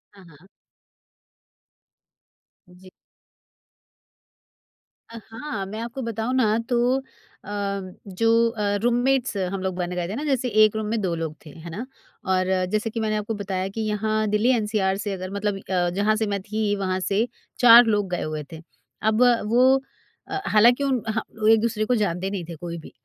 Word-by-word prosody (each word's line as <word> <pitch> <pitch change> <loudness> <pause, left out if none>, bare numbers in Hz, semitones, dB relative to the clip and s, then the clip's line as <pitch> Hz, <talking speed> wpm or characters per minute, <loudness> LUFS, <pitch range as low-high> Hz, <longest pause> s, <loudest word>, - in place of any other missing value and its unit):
हाँ, 195 - -16
हाँ। 160 +4 -19 2.2
जी। 180 +1 -17 2.2
अ, 230 - -9
हाँ, 225 -5 -5
मैं 215 +3 -7
आपको 235 +3 -5
बताऊँ 230 +1 -3
ना, 220 -4 +3
तो 245 +2 +2 0.4
अ, - - -11 0.6
जो 230 +4 +3
अ, 210 -3 -1
रूममेट्स 245 +1 +1
हम 190 0 -2
लोग 190 -1 -2
बन 180 -1 -3
गए 175 -1 -2
थे 200 - -4
ना, 290 - -4
जैसे 265 -4 0 0.2
एक 215 0 +3
रूम 220 0 -2
में 225 +1 -1
2 180 -3 -1
लोग 160 -2 -4
थे। - - -10
है 165 +3 -10
ना? 215 +9 -5 0.4
और 185 0 +1 0.2
जैसे 215 +1 0
कि 230 - -4
मैंने 215 -1 0
आपको 210 +2 -3
बताया 190 -2 -3
कि 225 - -2
यहाँ 215 0 0
दिल्ली 210 +4 +2
एनसीआर 210 -3 0
से 205 0 -3
अगर 185 -1 -5
मतलब 200 0 -1
अ, 180 -2 -1
जहाँ 210 +2 +2
से 220 - 0
मैं 200 - -2
थी, 210 +1 -1
वहाँ 190 -2 -1
से 205 +5 0 0.3
4 240 0 +9
लोग 205 -4 +1
गए 175 - -1
हुए 155 -1 -4
थे। 160 0 -9 0.4
अब 220 +2 +1 0.3
वो 260 +2 +5 0.5
अ, 395 - -3
हालाँकि 240 +6 +4
उन 260 -4 +1
ह 220 - 0 0.3
एक-दूसरे 220 -1 +2
को 250 +2 +1
जानते 190 -3 -1
नहीं 195 -3 -4
थे 165 - -6
कोई 170 +1 -6
भी। 160 - -13
210 Hz, 175 wpm, -24 LUFS, 190-230 Hz, 2.2 s, 4